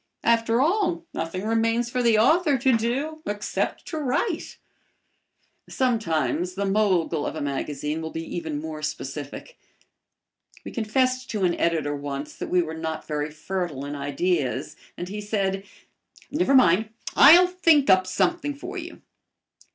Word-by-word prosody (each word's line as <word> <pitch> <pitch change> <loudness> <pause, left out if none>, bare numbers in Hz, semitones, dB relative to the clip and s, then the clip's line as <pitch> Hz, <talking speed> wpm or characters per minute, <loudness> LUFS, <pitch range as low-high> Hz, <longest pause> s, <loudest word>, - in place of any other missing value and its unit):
After 230 0 +3
all, 345 +1 +1
nothing 175 +5 -4
remains 230 +2 +1
for 250 - 0
the 230 -2 +4
author 295 +5 +4
to 260 0 +3
do 270 +8 -2
except 205 0 -2
to 315 - -3
write. 305 - -2 1.1
Sometimes 180 -7 0
the 200 +1 -1
mogul 190 -6 +1
of - - -3
a - - -4
magazine 145 +2 -3
will 160 - -4
be 165 +1 -5
even 160 -4 -3
more 155 0 -6
specific. 150 - -6 1.1
We - - -6
confessed 255 +3 0
to 210 -3 -2
an 175 -1 +3
editor 155 -4 0
once 140 0 -5
that - - -5
we 180 -1 +3
were 160 -1 -6
not 160 -1 -4
very 150 0 -2
fertile 155 -3 -4
in 145 - -5
ideas, 145 -1 -1 0.2
and 175 - -5
he 210 +3 -5
said, 195 -2 -1 0.7
"Never 295 -2 +2
mind, 215 -3 +5 0.3
I'll 340 +6 +9
think 330 -6 +3
up 185 0 +5
something 290 - 0
for 360 +6 -6
you." 345 0 -10
200 Hz, 145 wpm, -25 LUFS, 160-260 Hz, 1.1 s, I'll